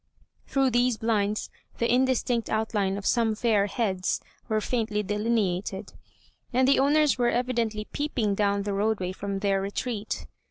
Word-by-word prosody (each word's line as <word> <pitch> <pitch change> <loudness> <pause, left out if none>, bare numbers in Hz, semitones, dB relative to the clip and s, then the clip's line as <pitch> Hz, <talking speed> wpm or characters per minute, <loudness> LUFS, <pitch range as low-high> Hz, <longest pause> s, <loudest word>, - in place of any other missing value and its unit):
Through 270 -2 +2
these 245 -1 +2
blinds 215 -2 0 0.3
the 235 - +1
indistinct 250 -2 +1
outline 210 -3 0
of 200 - -7
some 225 -2 +2
fair 210 -3 +2
heads 195 -4 -1 0.3
were 215 -1 +2
faintly 215 -2 -1
delineated, 205 -2 -1 0.6
and 255 +1 +3
the 275 - +5
owners 290 0 +3
were 240 -1 +3
evidently 235 -4 -1
peeping 245 -8 -1
down 200 0 +1
the 200 0 -2
roadway 200 -2 0
from 195 +1 -4
their 195 -1 +1
retreat. 210 +2 -3
220 Hz, 145 wpm, -27 LUFS, 200-245 Hz, 0.6 s, the